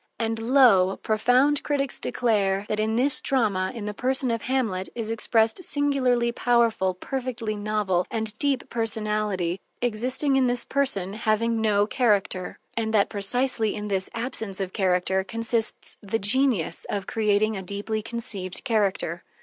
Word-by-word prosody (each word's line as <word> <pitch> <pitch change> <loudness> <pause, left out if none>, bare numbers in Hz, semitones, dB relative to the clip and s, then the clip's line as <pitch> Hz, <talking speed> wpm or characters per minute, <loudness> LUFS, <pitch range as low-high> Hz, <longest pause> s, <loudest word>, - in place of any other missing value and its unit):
And 225 -1 -2
lo! 225 -6 +4
profound 250 +7 +2
critics 275 -3 -2
declare 200 -5 0
that 215 - -1
in 220 +1 0
this 265 +4 +4
drama, 205 -8 0
in 220 -3 -6
the 210 - -4
person 255 +2 0
of 230 -1 -2
Hamlet, 225 -8 -1
is 225 -2 -4
expressed 225 - +1
singularly 265 -5 +1
powerful, 230 -6 +1
perfectly 240 0 -4
novel, 205 -4 -1
and 220 -2 -3
deep 275 -3 0
personality, 210 -5 -2 0.2
existing 250 +4 +1
in 260 -1 +3
this 245 0 0
person 205 -9 0
having 225 +1 0
no 205 -2 +2
character; 205 -5 0 0.2
and 220 -1 -1
that 200 - +3
precisely 225 +2 +3
in 210 0 -5
this 190 -1 0
absence 225 -4 -3
of 190 -1 -4
character 190 0 +1
consists 230 +2 -3
the 210 +2 -2
genius 225 -5 +2
of 200 -2 -3
creating 215 0 +1
a 195 - -4
deeply 205 +3 -4
conceived 210 -5 -3
character. 200 -7 -1
220 Hz, 145 wpm, -25 LUFS, 200-245 Hz, 0.2 s, lo